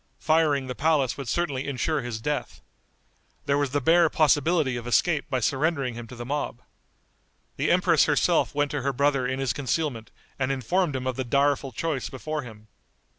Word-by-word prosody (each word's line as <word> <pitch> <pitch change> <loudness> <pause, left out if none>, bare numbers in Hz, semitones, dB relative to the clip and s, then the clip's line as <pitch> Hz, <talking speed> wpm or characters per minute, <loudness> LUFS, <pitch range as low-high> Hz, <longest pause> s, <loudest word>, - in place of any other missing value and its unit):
Firing 155 -4 +2
the 130 - -4
palace 140 -2 +1
would 140 -3 -7
certainly 140 -2 -1
insure 145 +3 -1
his 120 -2 -5
death. 150 +5 -3 0.9
There 140 0 +1
was 145 -2 0
the 145 +2 0
bare 165 +4 +4
possibility 150 -2 +2
of 120 0 -6
escape 150 +4 +1
by 130 -2 -1
surrendering 140 0 0
him 115 0 -8
to 125 - -10
the 120 0 -7
mob. 140 -3 -3 0.9
The - - -1
empress - - +4
herself - - +2
went 145 0 +1
to 145 - -2
her 140 +2 -1
brother 140 -1 +1
in 130 +1 -2
his 135 -2 -1
concealment 140 -4 -2 0.3
and 130 0 0
informed 145 - 0
him 130 -1 -3
of 130 -1 -2
the 130 - -1
direful 140 +2 +1
choice 150 -2 -3
before 155 +3 -4
him. 110 -4 -12
140 Hz, 180 wpm, -26 LUFS, 125-150 Hz, 0.9 s, bare